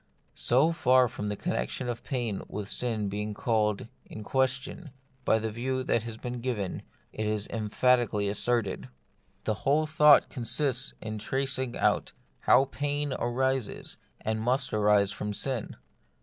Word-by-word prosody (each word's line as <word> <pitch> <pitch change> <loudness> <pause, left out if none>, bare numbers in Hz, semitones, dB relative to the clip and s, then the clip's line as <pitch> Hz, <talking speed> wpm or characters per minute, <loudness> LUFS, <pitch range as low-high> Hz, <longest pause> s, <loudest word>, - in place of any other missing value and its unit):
So 135 +7 +3
far 130 -6 +4
from 105 -4 -4
the 105 - -2
connexion 80 - -2
of 120 -1 -4
pain 120 -7 -2
with 105 -1 -5
sin 110 -3 -1
being 105 +1 -3
called 105 -2 0 0.2
in 110 - -9
question 130 - -1 0.4
by - - +4
the 110 0 -2
view 130 +3 -2
that 120 - +1
has 115 0 -7
been 120 +1 -5
given, 110 -7 -2 0.3
it 110 0 -2
is 105 -1 -1
emphatically 115 -1 +2
asserted. 105 0 -1 0.5
The 110 - 0
whole 150 +3 +3
thought 150 -1 +6
consists 135 +1 -1
in 110 -1 -4
tracing 130 +1 -1
out - - +1 0.3
how 130 +2 +5
pain 145 +1 -2
arises 130 -1 -1 0.2
and 110 0 -2
must 130 +3 +1
arise 105 -1 +4
from 105 0 -4
sin. 130 +1 -1
120 Hz, 145 wpm, -29 LUFS, 105-130 Hz, 0.5 s, thought